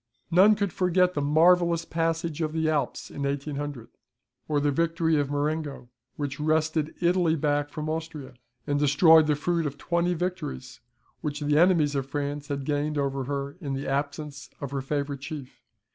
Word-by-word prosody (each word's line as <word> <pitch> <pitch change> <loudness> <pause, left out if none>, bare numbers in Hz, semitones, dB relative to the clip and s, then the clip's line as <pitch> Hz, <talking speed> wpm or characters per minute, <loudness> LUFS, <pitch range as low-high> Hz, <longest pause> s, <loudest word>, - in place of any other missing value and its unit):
None 195 +5 +6
could 200 -3 -2
forget 180 0 +2
the 145 - -1
marvellous 170 +3 +4
passage 165 -1 -1
of 155 -1 -1
the 160 0 0
Alps 155 -2 -1
in 140 - -7
1800, 140 -2 -3 0.6
or 150 -1 +1
the 145 0 +1
victory 165 +1 +1
of 145 -1 0
Marengo, 145 -3 -2 0.3
which 145 -1 -4
wrested 155 0 0
Italy 175 -2 +3
back 145 -1 0
from 150 +1 -5
Austria, 155 -4 -5 0.3
and 145 -1 0
destroyed 155 +2 +6
the 150 - +3
fruit 165 +2 0
of 140 0 -6
twenty 170 +3 0
victories, 175 - -4 0.4
which 150 0 -4
the 150 +1 +2
enemies 165 -5 +4
of 135 -2 -2
France 145 0 -3
had 140 -2 -3
gained 150 +1 -1
over 135 -2 -1
her 140 +2 -4
in 140 -4 -3
the 135 +1 -4
absence 145 +1 -3
of 140 -2 -5
her 140 -1 -2
favourite 140 0 -3
chief. 135 -1 -8
150 Hz, 170 wpm, -26 LUFS, 140-165 Hz, 0.6 s, None